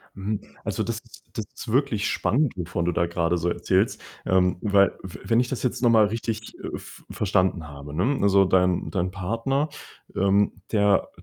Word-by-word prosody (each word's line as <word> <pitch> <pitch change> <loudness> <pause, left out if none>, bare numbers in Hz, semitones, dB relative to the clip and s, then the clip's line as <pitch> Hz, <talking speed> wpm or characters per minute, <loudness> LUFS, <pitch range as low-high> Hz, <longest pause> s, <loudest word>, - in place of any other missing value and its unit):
Mhm, 100 +2 -3 0.2
also - - -1
das - - -2
ist - - -17
das - - -4
ist - - -9
wirklich 125 -6 +1
spannend, 140 +1 +1
wovon 85 -1 -2
du 90 - +1
da 85 +1 +1
grade 85 0 0
so 85 +2 -1
erzählst. - - +1 0.3
Ähm, 90 -1 +3
weil 100 -1 +3
w 95 -2 -8
wenn 115 +1 +3
ich 125 - 0
das 130 - -3
jetzt 125 0 -1
noch 120 - +5
mal 110 -2 +6
richtig, 115 +1 -4
äh, - - -5
v - - -13
verstanden 95 -4 +1
habe, 70 +1 -9
ne, 125 - +1
also 100 -1 +5
dein 90 -3 +2
dein 90 +1 -1
Partner, 115 +10 -1 0.5
ähm, 100 +1 +3 0.2
der 100 -2 +3
100 Hz, 185 wpm, -25 LUFS, 90-115 Hz, 0.5 s, mal